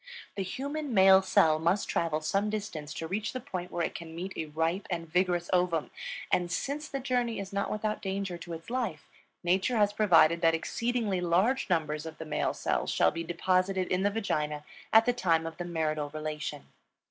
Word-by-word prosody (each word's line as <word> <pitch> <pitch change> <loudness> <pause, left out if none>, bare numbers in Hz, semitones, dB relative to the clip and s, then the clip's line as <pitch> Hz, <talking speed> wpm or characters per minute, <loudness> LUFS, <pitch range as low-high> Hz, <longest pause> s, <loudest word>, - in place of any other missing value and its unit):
The 200 - -2
human 275 +7 -3
male 190 0 +8
cell 160 -4 +4
must 170 +5 +1
travel 160 -2 0
some 195 +6 0
distance 200 -8 -4
to 165 - -4
reach 205 +5 -2
the 255 - -3
point 185 -9 -5
where 170 -1 0
it - - -4
can 165 -1 -8
meet 185 +3 -5
a 160 - -3
ripe 165 +5 -1
and 170 -2 -3
vigorous 175 +1 +1
ovum; 180 -3 +1 0.4
and 175 -1 +1
since 290 - -2
the 275 - -4
journey 245 -4 0
is 195 0 -6
not 200 0 -1
without 215 0 -2
danger 195 -2 -3
to 170 0 -7
its 165 +7 -8
life, 255 0 -2 0.4
Nature 190 +7 +2
has 205 -1 +3
provided 170 -5 +5
that 165 -1 +4
exceedingly 225 +1 -1
large 190 +11 +2
numbers 155 -2 0
of 160 - -8
the 160 - -7
male 155 - -1
cells - - -1
shall - - +3
be 165 - -4
deposited 185 +2 0
in 185 0 +1
the 200 - +3
vagina 150 -8 -2 0.3
at 225 +1 +7
the 245 - +3
time 165 -8 +1
of 165 0 -6
the 175 - -4
marital 155 -3 -1
relation. 150 -1 -5
180 Hz, 195 wpm, -30 LUFS, 165-210 Hz, 0.4 s, male